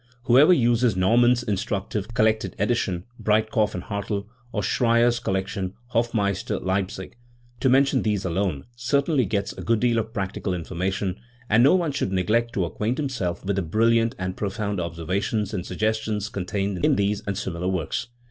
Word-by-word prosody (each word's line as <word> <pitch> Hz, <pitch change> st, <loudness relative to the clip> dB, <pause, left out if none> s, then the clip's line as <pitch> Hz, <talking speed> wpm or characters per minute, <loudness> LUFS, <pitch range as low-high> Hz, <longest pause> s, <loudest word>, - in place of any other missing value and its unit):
Who 125 Hz, +1 st, +5 dB
ever 150 Hz, +5 st, +7 dB
uses 120 Hz, -, +3 dB
Naumann's 120 Hz, +6 st, +4 dB
instructive 100 Hz, -1 st, -2 dB
collected 110 Hz, -3 st, +1 dB
edition 100 Hz, -5 st, 0 dB, 0.2 s
(Breit 110 Hz, 0 st, +1 dB
kopf 110 Hz, -2 st, +1 dB
and 90 Hz, -, -4 dB
Hartel) 100 Hz, 0 st, -3 dB, 0.3 s
or 105 Hz, -3 st, -2 dB
Schreyer's 120 Hz, +1 st, +3 dB
collection 95 Hz, 0 st, -2 dB, 0.2 s
(Hofmeister, 115 Hz, -2 st, 0 dB
Leipzig) 95 Hz, 0 st, -3 dB, 0.4 s
to 130 Hz, -, +2 dB
mention 135 Hz, +1 st, +4 dB
these 105 Hz, -3 st, -1 dB
alone 85 Hz, -5 st, -1 dB
certainly 140 Hz, +2 st, +1 dB
gets 100 Hz, -2 st, -1 dB
a -, -, -9 dB
good 115 Hz, -1 st, +1 dB
deal 120 Hz, -1 st, +2 dB
of 110 Hz, 0 st, -4 dB
practical 95 Hz, -3 st, -3 dB
information, 95 Hz, +2 st, -3 dB, 0.3 s
and 110 Hz, +2 st, +6 dB
no 140 Hz, +8 st, +6 dB
one 170 Hz, -5 st, +1 dB
should 135 Hz, -9 st, -2 dB
neglect 110 Hz, +6 st, +1 dB
to 95 Hz, -, 0 dB
acquaint 110 Hz, +8 st, -2 dB
himself 125 Hz, -, -3 dB
with 100 Hz, 0 st, 0 dB
the -, -, +2 dB
brilliant 115 Hz, +6 st, +2 dB
and 95 Hz, 0 st, -3 dB
pro 100 Hz, -, -2 dB
found 100 Hz, -1 st, -3 dB
observations 90 Hz, +6 st, -2 dB
and 90 Hz, -3 st, -3 dB
suggestions 110 Hz, -1 st, -1 dB
contained 100 Hz, -1 st, -3 dB
in -, -, +4 dB
these 100 Hz, +1 st, 0 dB
and 100 Hz, -1 st, -2 dB
similar 90 Hz, -3 st, -3 dB
works*. 95 Hz, +4 st, -2 dB
105 Hz, 165 wpm, -24 LUFS, 95-115 Hz, 0.4 s, ever